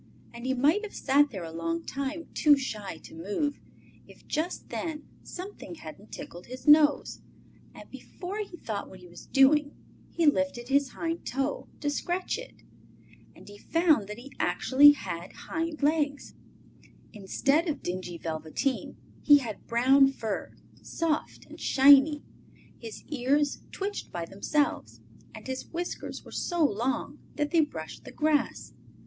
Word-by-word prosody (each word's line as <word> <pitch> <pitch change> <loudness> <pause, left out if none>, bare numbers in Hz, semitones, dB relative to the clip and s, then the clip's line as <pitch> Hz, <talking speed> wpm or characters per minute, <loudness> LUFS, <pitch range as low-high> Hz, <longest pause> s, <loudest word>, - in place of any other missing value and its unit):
And 235 +2 -7
he 260 - +1
might 300 - +3
have 425 - -7
sat 285 +2 +3
there 190 -8 -6
a 165 - -7
long 165 0 -3
time, 280 +4 -4
too 295 -2 +5
shy 210 -10 -5
to - - -12
move, 205 - -2 0.5
if - - -17
just 325 +4 -3
then 310 -2 -4 0.2
something 365 - -8
hadn't 165 +6 -11
tickled 175 +1 -9
his 255 +4 -9
nose, 295 -1 +5 0.5
and - - -11
before 385 +3 -7
he 395 -4 -6
thought 215 -9 -5
what 190 - -12
he 180 - -13
was 175 0 -13
doing 285 +2 +4 0.3
he 335 - 0
lifted 280 -4 +1
his 275 -1 +2
hind 330 +1 -3
toe 270 +3 -2
to 290 - 0
scratch 355 +8 -2
it. - - -12 0.7
And - - -16
he 205 0 -12
found 320 - +2
that 210 +1 -7
he 265 +4 -11
actually 290 +3 +6
had 175 -10 -6
hind 325 -2 -4
legs! 290 -1 0 0.8
Instead 275 - +1
of 305 - -3
dingy 180 -1 -4
velveteen 160 - -3 0.2
he 290 -1 +8
had 235 -7 -6
brown 265 +4 +5
fur, 220 -6 -4 0.3
soft 325 -3 -2
and - - -13
shiny, 285 +2 +6 0.6
his 225 -2 -9
ears 285 +1 +1
twitched 405 +1 -4
by 170 -1 -4
themselves, 290 - -1 0.4
and - - -10
his 260 0 -5
whiskers 350 +1 -5
were - - -12
so 345 -3 +1
long 245 +2 -1 0.2
that 295 0 -1
they 340 - +4
brushed 300 - -5
the - - -10
grass. 305 -1 0
280 Hz, 150 wpm, -28 LUFS, 220-310 Hz, 0.8 s, he